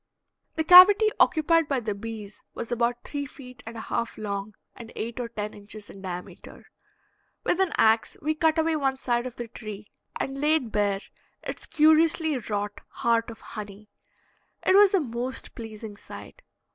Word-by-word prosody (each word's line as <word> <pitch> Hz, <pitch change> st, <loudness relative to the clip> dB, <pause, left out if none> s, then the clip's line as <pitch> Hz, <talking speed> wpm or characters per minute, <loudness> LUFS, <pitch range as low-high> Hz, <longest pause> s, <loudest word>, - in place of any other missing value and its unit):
The 320 Hz, -, 0 dB
cavity 395 Hz, +6 st, +9 dB
occupied 325 Hz, 0 st, +3 dB
by 275 Hz, -3 st, 0 dB
the 215 Hz, -3 st, -3 dB
bees 210 Hz, -1 st, -8 dB
was 235 Hz, -, -6 dB
about 240 Hz, 0 st, 0 dB
three 285 Hz, -1 st, -4 dB
feet 250 Hz, -4 st, -13 dB
and 230 Hz, 0 st, -7 dB
a -, -, -5 dB
half 235 Hz, +1 st, -3 dB
long 200 Hz, -1 st, -5 dB, 0.2 s
and 230 Hz, -1 st, -11 dB
eight 235 Hz, +2 st, -5 dB
or 240 Hz, -1 st, -3 dB
ten 210 Hz, -2 st, -5 dB
inches 205 Hz, 0 st, -8 dB
in 195 Hz, -, -13 dB
diameter. 180 Hz, -2 st, -9 dB, 0.7 s
With 355 Hz, -, 0 dB
an 380 Hz, -4 st, +2 dB
ax 220 Hz, 0 st, +3 dB
we 310 Hz, +1 st, 0 dB
cut 315 Hz, 0 st, +2 dB
away 320 Hz, 0 st, +2 dB
one 270 Hz, -3 st, 0 dB
side 240 Hz, -1 st, -1 dB
of 250 Hz, -, -9 dB
the 240 Hz, -, -6 dB
tree 210 Hz, -2 st, -9 dB, 0.3 s
and 270 Hz, +1 st, -3 dB
laid 300 Hz, -6 st, +1 dB
bare 205 Hz, -2 st, 0 dB, 0.4 s
its -, -, -6 dB
curiously 315 Hz, 0 st, +4 dB
wrought 205 Hz, -4 st, -4 dB
heart 230 Hz, 0 st, 0 dB
of 225 Hz, -, -11 dB
honey. 210 Hz, -1 st, -9 dB, 0.7 s
It -, -, +4 dB
was 400 Hz, 0 st, +6 dB
a -, -, +4 dB
most 250 Hz, -2 st, -4 dB
pleasing 220 Hz, -2 st, -8 dB
sight. -, -, -12 dB
235 Hz, 170 wpm, -26 LUFS, 215-310 Hz, 0.7 s, cavity